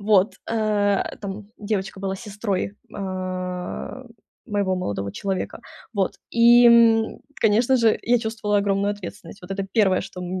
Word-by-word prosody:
Вот. 200 -1 +3 0.2
А, 210 -3 +1
там 200 0 -6
девочка 200 -2 -3
была 195 0 -2
сестрой, 205 -1 -3 0.2
а, 185 +4 -4 0.4
моего 200 -4 0
молодого 100 - -3
человека. 195 +1 -3 0.3
Вот, 195 -4 0 0.2
и, 240 +1 +7
м, 230 -1 +5 0.2
конечно 230 +5 +4
же 230 -3 +4
я 240 +1 +3
чувствовала 220 -2 -1
огромную 200 0 +1
ответственность. 205 +1 -8
Вот 180 - -12
это 195 0 -2
1, 195 -4 +4
что, 180 - -8
м, 180 - -5
205 Hz, 140 wpm, -23 LUFS, 190-220 Hz, 0.4 s, и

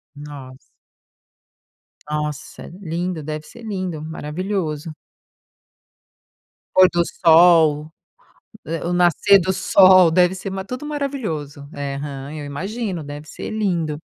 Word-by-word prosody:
Nossa. 145 -3 -10 1.5
Nossa, 150 -1 -5
lindo, 175 -1 -3
deve 155 +1 -6
ser 235 +9 -14
lindo, 185 -7 -4
maravilhoso. 160 0 -4 1.9
Pôr 185 0 +8
do 175 - +2
sol 160 -3 +4 0.8
o 155 - -8
eh 165 - -3
o 180 - -1
nascer 180 +3 +4
do 190 0 0
sol 185 -1 +6
deve 180 +2 +3
ser 190 +1 -6
ma 190 0 -5
tudo 250 +7 -6
maravilhoso. 210 - -4
É, 140 -1 -4
aham, 140 0 -6
eu 150 - -6
imagino, 185 +4 -4
deve 145 +1 -9
ser - - -7
lindo. 175 -8 -1
165 Hz, 120 wpm, -21 LUFS, 150-190 Hz, 1.9 s, Pôr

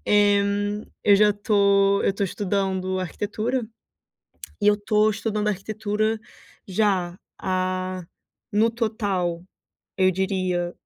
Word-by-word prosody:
Eh, 205 -1 +4 0.6
eu 200 -1 +6
já 210 0 +5
tô 200 -1 +3
eu - - +3
tô 200 - -4
estudando 190 -1 -1
arquitetura, 220 +6 -2 1.0
e 205 - +3
eu 210 - +7
estou 210 +1 +2
estudando 210 0 -2
arquitetura 215 +2 -1 0.5
já 185 -3 0 0.2
há, 185 -1 -2 0.5
no 220 +3 +3
total, 200 -7 -1 0.6
eu 185 0 +5
diria 185 -2 -1
200 Hz, 105 wpm, -24 LUFS, 185-210 Hz, 1.0 s, eu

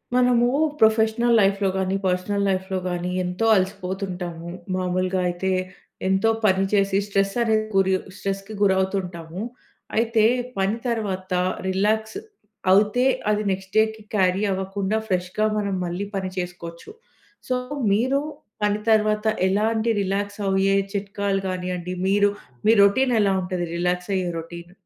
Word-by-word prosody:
మనము 245 -1 +4 0.3
ప్రొఫెషనల్ 220 +2 +3
లైఫ్‌లో 195 -1 +2
గాని, 190 0 0
పర్సనల్ 185 +2 0
లైఫ్‌లో 190 0 -1
గాని 175 0 -2
ఎంతో 180 +5 -2
అలసిపోతుంటాము. 185 -3 -3 0.3
మామూలుగా 185 0 0
అయితే 185 +2 -2 0.6
ఎంతో 190 +3 +2 0.2
పని 190 -1 +3
చేసి 195 -1 +3
స్ట్రెస్ 195 -1 +1
అనేది 220 -1 +2
గురియొ 190 -1 +3 0.2
స్ట్రెస్‌కి 195 +2 -4
గురవుతూ 190 0 +2
ఉంటాము. 170 0 -7 0.6
అయితే 225 -1 +2 0.3
పని 195 +3 +1
తర్వాత 195 -5 -2 0.4
రిలాక్స్ 215 - 0 0.5
అవుతే 210 +6 +4 0.3
అది 210 0 0
నెక్స్ట్‌డే‌కి 215 +4 0
క్యారీ 185 -1 +2
అవ్వకుండా 190 +2 -2
ఫ్రెష్‌గా 185 +3 0
మనం 200 -2 -1
మళ్ళీ 175 +4 -3
పని 190 -1 -2
చేసుకోవచ్చు. 175 -2 -6 0.6
సో 255 - +2 0.4
మీరు 260 +7 +2 0.4
పని 210 0 +1
తర్వాత 215 0 +2 0.2
ఎలాంటి 220 +3 +1
రిలాక్స్ 200 +1 -2
అయ్యే 195 +1 +2 0.2
చిట్కాలు 200 0 -1
కానియండి 180 -1 -3
మీరు 205 +1 +4 0.4
మీ - - +7
రొటీన్ 245 +5 +3
ఎలా 200 -2 +3
ఉంటది 180 -1 -3
రిలాక్స్ 180 +1 -1
అయ్యే 185 -2 -1
రొటీన్? 170 +1 -9
195 Hz, 125 wpm, -23 LUFS, 185-210 Hz, 0.6 s, మీ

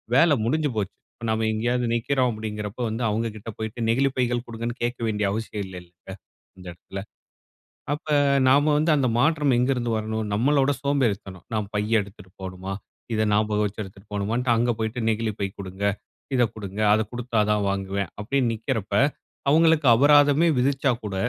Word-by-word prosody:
வேல 160 0 +5
முடிஞ்சுப் 150 -1 0
போச்சு. 100 -2 -2 0.2
இப்ப 115 - -8
நம்ம 110 0 +1
எங்கேயாவது 120 +2 0
நிக்கிறோம் 125 +2 +1
அப்பிடிங்கிறப்போ 105 +1 -5
வந்து, 115 +2 -3
அவுங்கக்கிட்ட 110 0 -3
போயிட்டு, 110 +2 -5
நெகிழிப்பைகள் 125 -1 +1
கொடுங்கன்னு 115 +1 -5
கேட்க 120 +1 -2
வேண்டிய 105 -1 0
அவசியம் 105 -1 -3
இல்லைல்லங்க, 90 0 -12 0.5
இந்த 90 -1 -12
இடத்தில. 95 +3 -8 0.9
அப்ப 150 - -7 0.4
நாம 145 +3 +4
வந்து 155 +2 +2
அந்த 130 -3 +2
மாற்றம் 150 -2 +3
எங்க 125 +2 +2
இருந்து 120 -2 -2
வரணும்? 110 0 -2
நம்மளோட 135 +5 +3
சோம்பேறித்தனம். 105 -10 -1
நாம் 105 -1 -2
பை 105 - +1 0.2
எடுத்துட்டுப் 100 -1 -13
போணுமா? 95 +1 -5 0.4
இத 110 - +1
ஞாபகம் 105 0 +2
வச்சு 105 +1 -4
எடுத்துட்டு 95 +1 -14
போணுமான்ட்டு, 115 +5 0
அங்க 120 +1 +2
போயிட்டு 110 +2 -2
நெகிழி 110 0 -1
பை 100 - 0
குடுங்க 95 +1 -5 0.5
இத 125 - +4
குடுங்க, 100 -1 -7
அத 110 - +3
குடுத்தா 120 -2 -2
தான் 105 -1 +1
வாங்குவேன். 100 -1 -2
அப்பிடின்னு 120 +2 0
நிற்கிறப்ப, 110 -3 -3 0.6
அவுங்களுக்கு 160 -1 +4
அபராதமே 145 +5 +5
விதிச்சாக்கூட, 125 -5 0
115 Hz, 150 wpm, -24 LUFS, 105-130 Hz, 0.9 s, வேல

